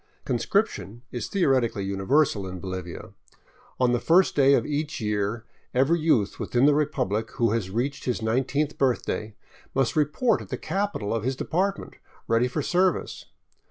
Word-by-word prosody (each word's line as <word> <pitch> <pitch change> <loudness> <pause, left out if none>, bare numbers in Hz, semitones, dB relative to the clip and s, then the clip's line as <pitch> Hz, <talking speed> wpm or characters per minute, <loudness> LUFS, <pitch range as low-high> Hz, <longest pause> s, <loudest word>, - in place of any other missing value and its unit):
Conscription 120 - -1
is 120 -3 -4
theoretically 130 - +1
universal 100 +2 +1
in 90 0 -6
Bolivia. 95 -1 -6 0.7
On 125 -1 +3
the 120 - +2
first 170 +10 +4
day 140 -1 +5
of - - +1
each 150 +1 -2
year 105 +1 -2 0.3
every 140 +7 +3
youth 145 -11 +1
within 125 +2 +1
the 145 - +6
repubfic 115 -8 0
who 115 -3 +1
has 110 -4 -1
reached 125 +7 -2
his 125 - -1
nine 115 +4 0
teenth 145 +3 -2
birthday 120 -5 -1 0.4
must 135 -2 +1
report 155 - +2
at - - -11
the - - -3
capital 195 - -2
of 115 -2 -2
his 130 +2 -1
department, 190 +8 -2 0.3
ready 115 +2 +3
for 125 - -3
service. 180 -1 0
125 Hz, 160 wpm, -25 LUFS, 110-150 Hz, 0.7 s, the